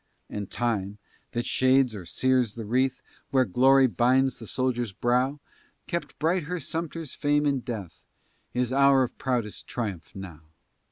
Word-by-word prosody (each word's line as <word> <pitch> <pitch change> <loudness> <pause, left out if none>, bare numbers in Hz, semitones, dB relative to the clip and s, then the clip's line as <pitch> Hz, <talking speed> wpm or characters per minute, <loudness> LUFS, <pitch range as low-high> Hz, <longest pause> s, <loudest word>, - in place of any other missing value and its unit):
And 100 -2 -4
time, 105 -4 -1 0.4
that 120 0 -1
shades 130 -1 +3
or 95 -5 -8
sears 130 0 +1
the 115 -2 -6
wreath, 130 +4 +1 0.3
Where 130 -1 +3
glory 135 +6 +5
binds 130 +2 +2
the 115 - -9
soldier's 120 -3 -1
brow, 125 +7 +1 0.5
Kept 170 - -4
bright 165 +1 +1
her 180 +3 -3
Sumter's 165 0 -4
fame 145 0 +1
in 140 -2 +2
death, 110 - -7 0.5
His 125 0 -1
hour 140 -1 +5
of 125 - -4
proudest 120 -5 -2
triumph, 100 -9 -5
now. 90 -5 -8
125 Hz, 150 wpm, -27 LUFS, 115-135 Hz, 0.5 s, glory